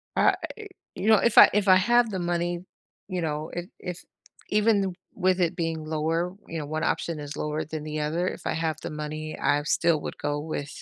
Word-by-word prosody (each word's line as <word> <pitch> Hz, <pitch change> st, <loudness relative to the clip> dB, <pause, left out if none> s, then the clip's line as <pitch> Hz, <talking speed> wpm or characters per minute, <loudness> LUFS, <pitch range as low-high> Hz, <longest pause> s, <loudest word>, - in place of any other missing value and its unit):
Uh, -, -, +5 dB, 0.6 s
you 205 Hz, -, -3 dB
know, 220 Hz, -, +8 dB
if 235 Hz, -, +1 dB
I -, -, +11 dB
if 205 Hz, -1 st, +2 dB
I 185 Hz, -, +8 dB
have 240 Hz, +5 st, +4 dB
the 190 Hz, -, -3 dB
money, 175 Hz, 0 st, -1 dB, 0.5 s
you 180 Hz, -2 st, -2 dB
know, 155 Hz, 0 st, -2 dB
if 175 Hz, 0 st, -4 dB
if 180 Hz, -1 st, -6 dB, 0.5 s
even 205 Hz, -3 st, +2 dB, 0.2 s
with 185 Hz, 0 st, +1 dB
it 170 Hz, 0 st, +1 dB
being 165 Hz, -2 st, -2 dB
lower, 160 Hz, +3 st, -1 dB
you 165 Hz, -, -5 dB
know, 150 Hz, -, -4 dB
one 155 Hz, +2 st, -3 dB
option 165 Hz, -2 st, -1 dB
is 145 Hz, 0 st, -6 dB
lower 150 Hz, +1 st, -2 dB
than 155 Hz, 0 st, -5 dB
the 155 Hz, 0 st, -4 dB
other, 165 Hz, +4 st, 0 dB
if -, -, -4 dB
I -, -, 0 dB
have 160 Hz, -1 st, -1 dB
the -, -, -5 dB
money, 155 Hz, +1 st, -5 dB
I 145 Hz, +1 st, +2 dB
still 165 Hz, 0 st, +2 dB
would -, -, -6 dB
go 145 Hz, 0 st, -2 dB
with 145 Hz, -2 st, -4 dB
165 Hz, 210 wpm, -26 LUFS, 155-180 Hz, 0.6 s, I